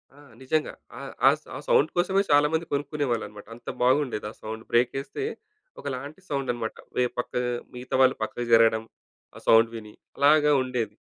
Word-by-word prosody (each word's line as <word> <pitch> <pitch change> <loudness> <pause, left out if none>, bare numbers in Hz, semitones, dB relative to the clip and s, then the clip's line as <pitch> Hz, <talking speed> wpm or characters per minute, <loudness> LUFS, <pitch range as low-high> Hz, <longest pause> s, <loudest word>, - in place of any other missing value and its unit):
ఆ! - - -18 0.2
నిజంగా 150 +4 -1 0.2
ఆ - - -7 0.3
ఆ - - +10
సౌ - - -26
ఆ - - -4
సౌండ్ 155 - +4
కోసమే 190 +3 +3
చాలా 145 +1 +6
మంది 165 +1 0
కొనుక్కునేవాళ్ళన్నమాట. 140 -7 -2
అంత 120 - -9
బాగుండేది. 130 -3 +2
ఆ - - -15
సౌండ్. 110 +1 -6
బ్రేకేస్తే 125 - 0 0.6
ఒకలాంటి 140 +4 -6
సౌండన్నమాట. 125 -5 -2 0.2
వే 125 - +3
పక్క 125 - -3 0.4
మిగతావాళ్ళు 130 +1 +2
పక్కకు 120 +2 -4
జరగడం 115 -1 +5 0.5
ఆ - - -10
సౌండ్ 115 0 +6
విని. 105 -2 -9 0.2
అలాగా 150 +1 +5
ఉండేది. 120 -5 -3
130 Hz, 150 wpm, -26 LUFS, 115-145 Hz, 0.6 s, ఆ